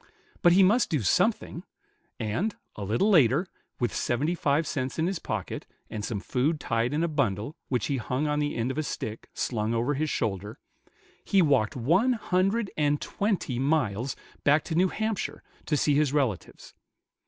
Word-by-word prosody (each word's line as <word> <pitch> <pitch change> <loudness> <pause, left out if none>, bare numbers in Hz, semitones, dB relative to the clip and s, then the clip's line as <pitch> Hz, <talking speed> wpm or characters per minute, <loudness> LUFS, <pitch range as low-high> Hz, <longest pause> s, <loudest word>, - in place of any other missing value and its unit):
But 175 - +6
he 190 +2 +6
must 220 +7 +4
do 150 -5 0
something; - - +1 0.6
and, 115 - -1 0.2
a 105 - -6
little 115 - +2
later, 150 - +5 0.3
with 120 - 0
seventy 140 +8 0
five 150 -2 +1
cents 130 -3 -3
in 160 - +1
his 185 -1 -1
pocket, 105 -4 -4 0.2
and 105 -2 -4
some 105 -1 -2
food 140 +9 0
tied 115 -2 0
in 150 +3 0
a - - +2
bundle, 140 - -1
which 125 -5 0
he 140 - -1
hung 130 +5 -2
on 150 0 0
the 145 0 -1
end 120 +3 -1
of 145 - -3
a - - +2
stick, 110 -6 -5
slung 110 -1 -1
over 120 +5 +1
his 155 +2 -1
shoulder, 105 -4 -2 0.7
he 195 -2 +3
walked 135 -8 +2
one 175 - +3
hundred 195 0 0
and 145 -1 +1
twenty 195 - -1
miles 130 -4 0 0.3
back 145 +1 +4
to 165 - -5
New 180 +4 +4
Hampshire, 220 0 -3 0.2
to 150 - +2
see 145 - +2
his 145 -1 +2
relatives. 130 - -2
145 Hz, 175 wpm, -27 LUFS, 115-170 Hz, 0.7 s, But